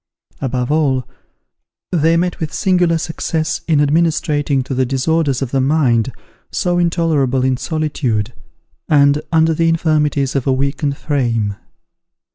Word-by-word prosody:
Above 125 -1 -2
all, 135 -5 +1 0.8
they 165 -1 +2
met 175 0 -1
with 155 -2 -3
singular 180 -3 +2
success 160 -1 -2
in 155 -3 +3
administrating 145 -2 +1
to 135 - -5
the 130 0 +1
disorders 135 +1 0
of 130 - -5
the 135 - +1
mind, 130 -5 +2 0.4
so 175 -1 0
intolerable 160 -7 +1
in 130 -1 +2
solitude, 130 -7 -2 0.6
and 145 0 +4
under 160 0 +3
the 165 +1 +1
infirmities 150 -4 +1
of 135 -1 -1
a - - +3
weakened 140 +2 -1
frame. 115 -8 -1
145 Hz, 130 wpm, -17 LUFS, 130-160 Hz, 0.8 s, and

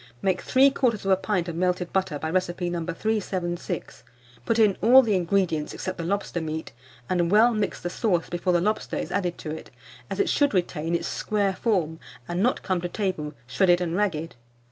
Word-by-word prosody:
Make 185 +3 0
3/4 235 -8 +3
pint 185 -5 0
of 170 - -4
melted 180 0 -1
butter 190 -5 0
by 160 +2 -3
recipe 175 -1 -1
No. 170 -1 -2
376; 180 -2 -3 0.5
put 230 - +2
in 210 -4 +4
all 255 +5 +8
the 220 -3 +1
ingredients 175 -4 0
except 185 -1 -5
the - - -2
lobster 185 -1 -2
meat, 160 0 -4 0.4
and 175 -2 +1
well 220 +5 +5
mix 210 -2 -1
the 175 - -4
sauce 180 -7 0
before 175 +1 -1
the 175 - +3
lobster 210 +4 -1
is - - -4
added 180 -3 -1
to 155 - -6
it, 160 - -7 0.4
as - - -4
it 400 - +3
should 285 -7 +2
retain 170 -2 0
its - - -2
square 205 -3 0
form, 170 -9 0 0.3
and 175 +1 -2
not 245 +4 +1
come 185 -2 0
to 175 - -3
table 175 -7 -3
shredded 175 +8 +3
and 175 -1 -2
ragged. 170 -5 -1
185 Hz, 190 wpm, -25 LUFS, 170-205 Hz, 0.5 s, all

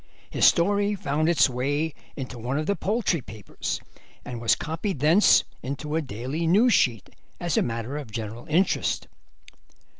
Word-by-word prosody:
His - - +3
story 205 +4 +3
found 155 -2 0
its 170 - +5
way 145 +5 -1 0.2
into 130 -3 -6
one 125 +5 -2
of 155 - -1
the 200 - +1
poultry 200 - 0
papers, 110 -4 -5 0.5
and 120 -2 -6
was 115 -1 +3
copied 165 +3 -3
thence 160 +9 +5 0.2
into 145 +3 -4
a 165 - +1
daily 135 +6 -4
news 215 +8 +5
sheet 120 - +1 0.3
as 175 -4 -1
a - - +3
matter 115 +4 -3
of 145 -6 -7
general 110 +2 -6
interest. 175 +5 +1
150 Hz, 155 wpm, -25 LUFS, 125-170 Hz, 0.5 s, its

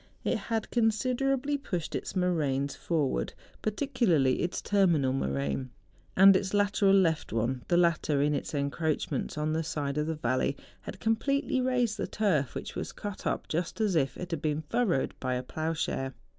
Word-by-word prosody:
It - - +1
had 225 +2 -3
considerably 255 +5 +1
pushed 175 - -4
its - - -4
moraines 145 -7 0
forward, 145 - -1 0.3
particularly 215 - +1
its 175 - -1
terminal 170 -10 +2
moraine, 70 - -2 0.5
and 195 +1 +9
its 190 +1 0
lateral 200 -1 +3
left 165 -5 +2
one; 120 +3 -1
the 175 - +3
latter 170 -4 +2
in 145 +1 +2
its 145 - -3
en¬ 140 -1 0
croachments 160 -1 -2
on 155 +1 0
the 160 - 0
side 150 -2 -2
of 150 - -1
the 160 - -1
valley 130 0 0 0.2
had - - -8
com¬ 225 0 +2
pletely 275 +1 0
raised 245 -4 +1
the - - -2
turf, 165 - 0
which - - -6
was - - -4
cut 205 -2 -6
up - - -2
just 170 +6 -2
as 210 -5 +1
if 135 -5 +1
it 180 0 -6
had 165 -3 -2
been 155 0 -1
furrowed 230 - +1
by 130 -1 -1
a 125 - -2
ploughshare. 155 -3 -2
165 Hz, 175 wpm, -29 LUFS, 140-210 Hz, 0.5 s, and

